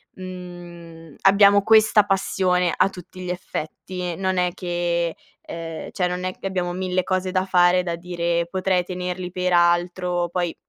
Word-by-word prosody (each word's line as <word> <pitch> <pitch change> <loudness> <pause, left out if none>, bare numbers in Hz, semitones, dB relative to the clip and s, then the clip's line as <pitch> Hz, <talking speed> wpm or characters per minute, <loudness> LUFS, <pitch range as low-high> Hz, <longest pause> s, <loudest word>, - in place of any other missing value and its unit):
mhmm, 175 -3 -10
abbiamo 200 +1 +6
questa 215 0 +5
passione 185 -3 +1
a - - +3
tutti 185 0 -12
gli 180 - -5
effetti. 180 0 -5
Non 190 +1 -1
è 180 -1 +1
che, 175 -2 -1 0.3
ehm, 165 -1 -7
cioè 180 - 0
non 180 0 -4
è 185 - -1
che - - -4
abbiamo 180 -2 -2
1000 185 0 -1
cose 185 0 -1
da 185 0 +1
fare, 180 -1 +4
da 170 -1 -2
dire: 170 -1 -2
"Potrei 185 -1 0
tenerli 180 0 -4
per 180 0 -1
altro". 175 0 +2
Poi 175 -1 -2
180 Hz, 155 wpm, -22 LUFS, 175-185 Hz, 0.3 s, abbiamo